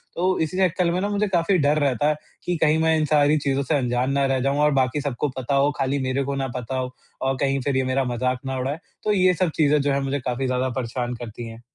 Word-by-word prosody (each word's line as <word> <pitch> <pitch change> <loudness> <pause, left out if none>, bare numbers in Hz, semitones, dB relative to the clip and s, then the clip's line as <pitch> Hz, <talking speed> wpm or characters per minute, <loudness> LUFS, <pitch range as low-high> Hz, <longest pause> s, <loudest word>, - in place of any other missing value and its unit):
तो 185 +2 +1
इसी 160 +3 -1
चक्कर 180 -2 +2
में 175 - 0
ना 205 - -1
मुझे 205 +1 0
काफ़ी 180 0 +2
डर 150 -1 +2
रहता 145 +1 +1
है, 155 - +1 0.3
कि 175 - 0
कहीं 155 0 +4
मैं 160 0 +3
इन 155 - +1
सारी 150 0 +3
चीज़ों 140 -1 0
से 145 +3 0
अनजान 125 0 0
ना 140 0 +2
रह 135 -1 +1
जाऊँ 140 +2 0
और 150 0 +4
बाकी 130 +3 -1
सबको 145 0 -2
पता 130 +2 -1
हो 140 +1 +3
खाली 135 +1 0
मेरे 130 +1 0
को 140 +1 -3
ना 135 -1 -1
पता 125 +2 -4
हो 130 0 -4 0.3
और 135 0 0
कहीं 135 0 +1
फ़िर 135 0 0
ये 130 - +2
मेरा 135 +1 +2
मज़ाक 125 +1 -1
ना 135 0 -2
उड़ाए। 135 +5 -2 0.2
तो 210 - +1
ये 185 -2 +4
सब 180 0 0
चीज़ें 150 -1 +3
जो 140 0 +1
है 140 - 0
मुझे 135 +1 -1
काफ़ी 125 +1 -2
ज़्यादा 130 0 0
परेशान 120 0 -3
करती 120 0 -7
हैं। 115 +1 -11
140 Hz, 265 wpm, -23 LUFS, 130-155 Hz, 0.3 s, कहीं